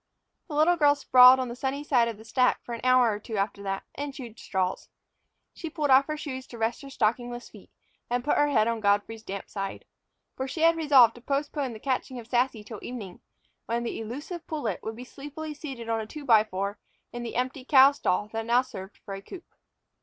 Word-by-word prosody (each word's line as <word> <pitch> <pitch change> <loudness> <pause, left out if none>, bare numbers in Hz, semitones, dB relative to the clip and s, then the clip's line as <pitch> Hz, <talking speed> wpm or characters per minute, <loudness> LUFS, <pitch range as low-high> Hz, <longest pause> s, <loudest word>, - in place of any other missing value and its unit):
The 305 - -6
little 325 +4 +4
girl 290 -2 +5
sprawled 255 -2 +7
on 255 - -1
the 235 - -6
sunny 270 +3 -3
side 250 -6 +3
of 225 -3 -5
a 220 - -13
stack 250 +2 +2
for 240 - -7
an 230 - -5
hour 255 -2 +5
or 205 - -5
two 215 +1 -6
after 200 0 -1
that, 195 -1 -3
and 285 +1 -4
chewed 235 -5 -9
straws. 185 -1 -2 0.6
She 330 - -6
pulled 300 -3 -1
off 265 +1 +6
her 305 0 -3
shoes 260 -4 -6
to 235 - -10
rest 225 +3 -1
her 275 - -10
stockingless 240 0 -1
feet, - - -15 0.4
and 245 0 0
put 295 - +1
her 290 - +3
head 220 -7 +3
on 230 -1 -1
Godfrey's 205 +2 +1
damp 200 -2 -6
side. 195 -1 -5 0.5
For 265 - -3
she 315 +5 -5
had 330 +1 +5
resolved 275 -8 +6
to 240 - -13
postpone 280 0 -2
the 220 - -9
catching 260 0 -2
of 235 - -8
Sassy 240 -2 0
till 210 0 -9
evening, 220 -7 -8 0.5
when 235 +1 -1
the 235 - -4
elusive 290 - -7
pullet 265 - -3
would 220 - -5
be 245 - -8
sleepily 295 +4 -8
seated 270 -6 -8
on 225 -1 0
a 215 - -7
two 300 +4 -9
by 220 -4 +6
four 200 0 -4 0.3
in 240 - -5
the 235 - -6
empty 255 +2 -2
cow 270 0 +7
stall 205 -7 -1
that 225 0 -3
now 245 +2 +4
served 195 -6 -10
for 200 - -9
a 195 - -6
coop. 355 - -11
245 Hz, 225 wpm, -27 LUFS, 220-280 Hz, 0.6 s, sprawled